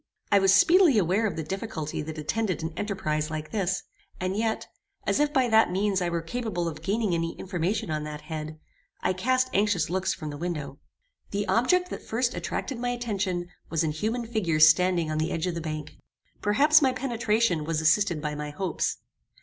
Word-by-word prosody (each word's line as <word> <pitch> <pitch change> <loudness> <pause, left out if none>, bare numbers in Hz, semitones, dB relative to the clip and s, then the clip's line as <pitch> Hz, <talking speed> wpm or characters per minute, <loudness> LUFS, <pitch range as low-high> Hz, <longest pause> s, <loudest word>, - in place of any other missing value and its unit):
I 200 - +6
was 195 -1 +4
speedily 330 - +6
aware 200 +4 +2
of 195 - -4
the 160 - -3
difficulty 160 -3 -4
that 155 +1 -6
attended 185 +4 -1
an 160 0 -3
enterprize 155 -6 -2
like 155 -1 -5
this; 190 -3 -1 0.4
and 185 +1 -1
yet, 220 +1 -1 0.4
as - - +1
if 295 0 +2
by 260 -3 +3
that 220 -2 +5
means 195 +1 0
I 175 - 0
were 170 -1 -2
capable 190 -3 -3
of 155 -2 -5
gaining 205 -1 0
any 165 0 -2
information 180 0 -2
on 155 -1 -2
that 150 0 -6
head, 155 -1 -6 0.4
I 185 - +2
cast 255 +7 +1
anxious 195 -5 +1
looks 190 +1 0
from 155 -4 -5
the 145 - -8
window. 150 -5 -4 0.5
The 205 +1 -2
object 255 - +2
that - - -5
first 240 +2 -1
attracted 260 -4 -4
my 245 0 -1
attention 200 -7 -2 0.2
was 165 -1 +1
an 155 - 0
human 220 +10 -2
figure 205 -9 0
standing 165 +1 +5
on 155 - -1
the 160 - 0
edge 165 +1 -1
of 180 - -1
the 170 - -4
bank. 155 -1 -6 0.4
Perhaps 295 +9 +5
my 265 -2 +3
penetration 230 - 0
was 160 0 -1
assisted 160 0 +2
by 150 0 -2
my 150 0 -4
hopes. 180 +3 -2
185 Hz, 195 wpm, -27 LUFS, 160-220 Hz, 0.5 s, I